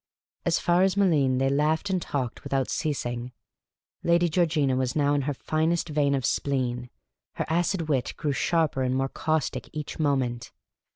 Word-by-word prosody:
As 165 - +3
far 175 +1 +2
as 190 0 +3
Malines 150 -10 +3
they 135 +1 +2
laughed 155 +7 +1
and 185 -2 0
talked 130 -6 -3
without 135 -2 -1
ceasing. 125 -4 -2 0.7
Lady 170 0 +3
Georgina 155 -5 +2
was 130 -1 -1
now 145 -1 +2
in 145 - +2
her - - 0
finest 160 +4 0
vein 145 -2 +2
of 130 -3 -1
spleen; 125 -3 -1 0.5
her - - -2
acid 170 +1 0
wit 135 -5 0
grew 150 - -1
sharper 160 -2 +1
and 130 0 +1
more 135 0 0
caustic 155 -5 -2
each 150 +1 -6
moment. 125 -6 0
145 Hz, 165 wpm, -26 LUFS, 130-160 Hz, 0.7 s, As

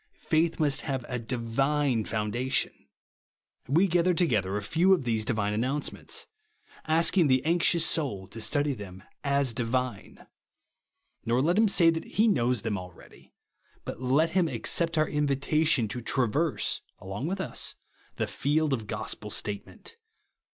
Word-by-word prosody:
Faith 165 +1 0
must 145 -2 +2
have 135 -4 -3
a 125 -1 -3
divine 125 +2 0
foundation. 110 +5 -1 0.9
We 165 +8 +4
feather 175 0 +2
together 105 - +1
a 105 - -4
few 170 - +3
of 170 - -5
these 115 -3 0
divine 105 -3 -1
announcements; 130 +7 -2 0.6
asking 165 +2 +3
the 130 0 +2
anxious 170 0 +3
soul 115 - -1
to 115 +2 -8
study 145 +4 +1
them 95 -5 -10 0.2
as 140 -3 +1
divine. 120 -2 -3 1.0
Nor 120 +2 +1
let 175 +6 +2
him 220 - +5
say 170 -4 +5
that 160 0 -3
he 220 +3 +2
knows 125 - +1
them 105 -4 -1
already; 90 -1 -14 0.5
but - - -6
let 140 +6 +2
him 180 -1 +2
accept 165 0 0
our 155 -1 +3
invitation, 145 -2 +1
to 125 +1 -4
traverse, 135 +6 0 0.2
along 95 +9 -5
with 190 +2 -3
us, 190 - -2 0.4
the - - -1
field 150 +1 0
of 110 -5 -3
gospel - - -4
statement. 105 - -5
135 Hz, 145 wpm, -28 LUFS, 115-160 Hz, 1.0 s, him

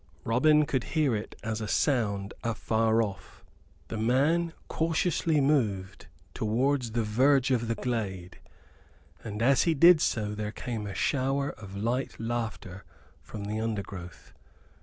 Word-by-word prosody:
Robin 150 +6 +4
could 130 -4 -1
hear 145 -7 +3
it 105 - -5
as 110 0 -3
a 110 - -3
sound 105 -9 0
afar 115 0 +1
off. 100 -3 -8 0.5
The 110 - -4
man 145 +9 +2 0.2
cautiously 160 -1 +1
moved 110 -10 0 0.3
towards 120 +2 0
the 115 -1 +1
verge 130 +5 +3
of 120 -2 +1
the 115 - -1
glade, 100 -8 -4 0.8
and 110 0 -4
as 135 +2 +4
he 165 -2 +2
did 170 +2 +7
so 105 -7 0
there 105 0 -4
came 110 -2 -5
a 100 - -6
shower 140 +1 0
of 100 -2 -10
light 120 +6 -2
laughter 115 -5 -4 0.4
from 105 - -8
the 105 +2 -3
undergrowth. 100 -5 -5
115 Hz, 140 wpm, -28 LUFS, 105-135 Hz, 0.8 s, did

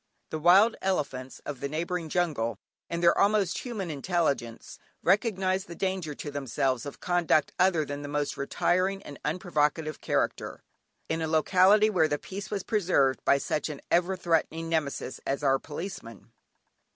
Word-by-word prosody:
The 155 - -3
wild 190 +8 +6
elephants 140 -9 -2
of 145 -3 -5
the 140 - -3
neighbouring 165 +2 -3
jungle, 155 -10 0 0.3
in 170 0 -2
their 170 0 +5
almost 200 -3 +2
human 210 -9 -4
intelligence, 140 -6 -2 0.2
recognised 190 -1 +1
the 170 - -8
danger 185 -5 -2
to 145 - -6
themselves 135 -1 -1
of 140 - -8
conduct 175 -3 +2
other 180 -4 +3
than 145 0 -5
the 145 - -6
most 145 0 -2
retiring 185 +7 0
and 145 - -10
unprovocative 155 -2 -1
character - - -2 0.4
in 160 0 -2
a 160 - -1
locality 185 +7 +4
where 170 -6 +3
the 145 - -1
peace 195 +6 -7
was 200 -3 -3
preserved 170 - +1
by 140 - +5
such 150 +3 -2
an 145 -2 -6
ever 180 +2 +2
threatening 165 -1 0
Nemesis 150 -5 -2
as 140 +2 -1
our 135 -1 +3
Policeman. 145 - -8
165 Hz, 155 wpm, -28 LUFS, 145-185 Hz, 0.4 s, wild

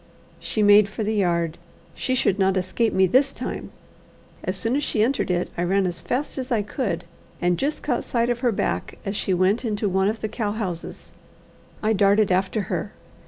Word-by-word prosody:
She 215 - -1
made 205 0 +7
for 215 +2 -4
the 215 +1 0
yard. 170 -5 0 0.3
She 255 - -1
should 205 -5 +1
not 190 0 +3
escape 185 +5 0
me 190 - +4
this 260 +9 +3
time. - - -5 0.7
As 185 +1 -2
soon 225 +5 0
as 290 - 0
she 215 - +1
entered 255 -1 0
it, 180 0 0
I - - -2
ran 190 +2 +2
as 175 -1 -3
fast 270 +2 -2
as 255 +1 -5
I 220 -3 +2
could, 205 - -2 0.4
and 175 0 +2
just 290 +3 -1
caught 250 -5 0
sight 235 0 0
of 240 - -2
her 245 -1 +2
back 205 - -2
as 195 +1 -2
she 190 -2 0
went 190 +7 +2
into 210 -2 -1
one 190 0 +2
of 220 +2 -2
the 215 - -1
cow 210 -1 -2
houses. 185 -6 -5 0.7
I 220 +1 +3
darted 200 0 +3
after 190 +4 +1
her. - - -3
205 Hz, 205 wpm, -24 LUFS, 190-230 Hz, 0.7 s, made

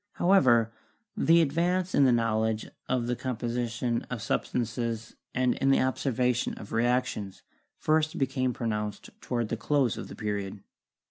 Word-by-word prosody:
However, 120 - +4 0.4
the 165 +1 +5
advance 175 +5 0
in 140 - +5
the 130 - +5
knowledge 110 -2 +1 0.2
of 125 -2 +1
the 125 +1 -1
composition 120 -1 -2
of 120 -4 -4
substances 115 -1 -2 0.2
and 125 -1 +2
in 135 - +2
the 135 - +5
observation 125 -2 0
of 100 - -10
reactions 120 -4 0 0.3
first 155 0 +1
became 130 -1 0
pronounced 105 -3 -3
toward 120 -3 -2
the 115 - -2
close 135 0 +1
of - - -6
the - - -9
Period. 100 -2 -4
120 Hz, 140 wpm, -28 LUFS, 115-130 Hz, 0.4 s, the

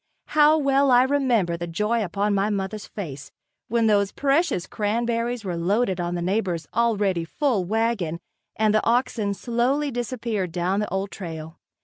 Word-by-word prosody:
How 305 +1 +5
well 275 -1 +3
I 250 0 +6
remember 255 -10 +1
the 170 +1 -5
joy 210 +7 0
upon 200 +2 -1
my 200 +1 +1
mother's 205 +1 -3
face, 145 -9 -7 0.4
when 230 0 +1
those 200 -2 +3
precious 280 - +1
cranberries 230 +2 -1
were 180 -2 -2
loaded 190 +3 0
on 175 0 -2
the 175 - -2
neighbor's 180 -4 -1
already 205 -6 +1
full 215 - 0
wagon 215 -5 0 0.4
and 215 -1 +2
the 215 - +2
oxen 230 -4 +1
slowly 250 +7 0
disappeared 230 -6 -3
down 180 +4 0
the 210 - -2
old 190 +2 -2
trail! 160 -3 -8
210 Hz, 155 wpm, -24 LUFS, 185-240 Hz, 0.4 s, I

